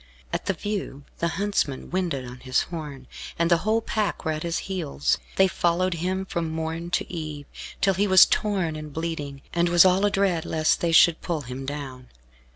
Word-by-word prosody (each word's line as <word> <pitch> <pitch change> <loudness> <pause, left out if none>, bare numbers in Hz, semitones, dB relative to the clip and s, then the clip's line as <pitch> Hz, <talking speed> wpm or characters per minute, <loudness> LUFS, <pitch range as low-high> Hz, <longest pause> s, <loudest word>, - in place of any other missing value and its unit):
At - - -3
the 195 - +2
view 195 -8 -4 0.2
the 170 - +1
huntsman 200 -9 -1
winded 170 -8 -1
on 125 +1 -9
his 130 0 +1
horn, 150 -6 -7 0.3
and 170 +1 +1
the 170 - +6
whole 215 +6 +1
pack 215 -4 -2
were 160 - +1
at 155 0 -3
his 170 0 -1
heels. 70 - -1 0.2
They 190 - +5
followed 180 +1 +1
him 185 +3 -2
from 170 -3 -3
morn 160 +1 -3
to 175 - -2
eve, 155 -3 -5 0.4
till 195 - +4
he 200 +3 +1
was 190 -1 +8
torn 190 -7 0
and 155 -1 -7
bleeding, 145 -3 -4
and 170 0 +2
was 175 +1 +7
all 185 +1 +4
adread 195 -5 +2
lest 155 0 +1
they 170 - +1
should 165 0 +6
pull 165 -3 -2
him 130 +1 -7
down. 135 -3 -6
170 Hz, 190 wpm, -25 LUFS, 150-185 Hz, 0.4 s, was